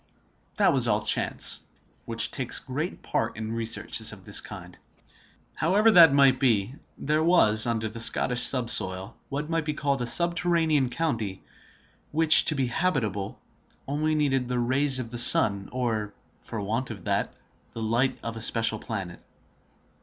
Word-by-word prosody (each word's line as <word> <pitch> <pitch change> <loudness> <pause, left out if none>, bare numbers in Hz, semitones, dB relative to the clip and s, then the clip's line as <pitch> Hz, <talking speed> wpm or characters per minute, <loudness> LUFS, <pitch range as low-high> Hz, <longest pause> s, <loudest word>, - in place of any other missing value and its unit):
That - - +2
was - - +1
all - - 0
chance, - - +1 0.4
which - - 0
takes - - -4
great - - -6
part - - -3
in 110 0 -6
researches 115 0 -1
of - - -14
this - - 0
kind. - - -11 0.8
However 215 +4 +2
that 170 -6 +7
might 135 -2 +3
be, 115 -3 0 0.2
there 155 +2 -1
was, 120 -11 +3
under 110 -2 -2
the 115 +2 -9
Scottish 120 +1 +2
subsoil, 115 -7 +2
what 145 +2 -5
might 165 -1 -1
be 150 0 -4
called 140 -3 -2
a 120 - -2
subterranean 170 -3 +1
county, 115 -10 -4 0.7
which, 160 0 +5
to 155 - +3
be 135 -2 -1
habitable, 120 - -3 0.5
needed 150 -1 -1
only 125 - -8
the 125 0 -3
rays 130 +3 +1
of 120 -3 -6
the 120 - +2
sun, 100 -4 +5
or, 110 -5 -4 0.3
for 115 - -8
want 115 +6 -4
of 100 -6 -9
that, - - -3 0.4
the 115 - -6
light 120 +4 -1
of 115 0 -5
a 115 - -7
special 115 -1 +2
planet. 95 -7 -7
125 Hz, 155 wpm, -25 LUFS, 110-150 Hz, 0.8 s, that